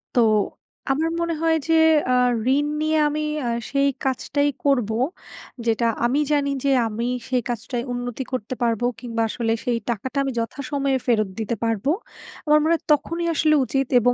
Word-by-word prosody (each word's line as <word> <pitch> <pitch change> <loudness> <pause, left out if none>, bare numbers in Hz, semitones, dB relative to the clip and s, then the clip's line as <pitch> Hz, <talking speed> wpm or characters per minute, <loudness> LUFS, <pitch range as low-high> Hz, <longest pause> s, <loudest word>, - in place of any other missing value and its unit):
তো - - +4 0.7
আমার 320 +4 +1
মনে 335 0 0
হয় 325 0 +3
যে 325 - +3 0.4
আ - - +4 0.4
ঋণ 290 - +1 0.2
নিয়ে 310 0 +1
আমি 305 +1 -2 0.3
আ - - 0 0.2
সেই 280 0 +2 0.2
কাজটাই 285 +2 0 0.2
করবো। 245 -6 +2 0.7
যেটা 230 +1 +1 0.2
আমি 265 +5 +2
জানি 285 -1 +2
যে 280 - +2 0.2
আমি 225 +2 -3 0.2
সেই 250 -2 +1
কাজটাই 240 +1 -3
উন্নতি 245 +1 -4
করতে 255 0 -3
পারবো 230 0 +1
কিংবা 230 -2 -3
আসলে 225 0 -1
সেই 240 -2 +1
টাকাটা 235 +5 -3
আমি 270 - -1
যথাসময়ে 275 +3 -1
ফেরত 215 -4 +2
দিতে 220 +1 -1
পারবো। 225 +5 0 0.5
আমার 300 0 +5
মনে 320 +2 +2
হয় 325 - -1
তখনই 335 +4 -1
আসলে 305 0 +3
উচিত 270 +1 0
এবং 245 +1 +3
260 Hz, 165 wpm, -23 LUFS, 235-290 Hz, 0.7 s, আমার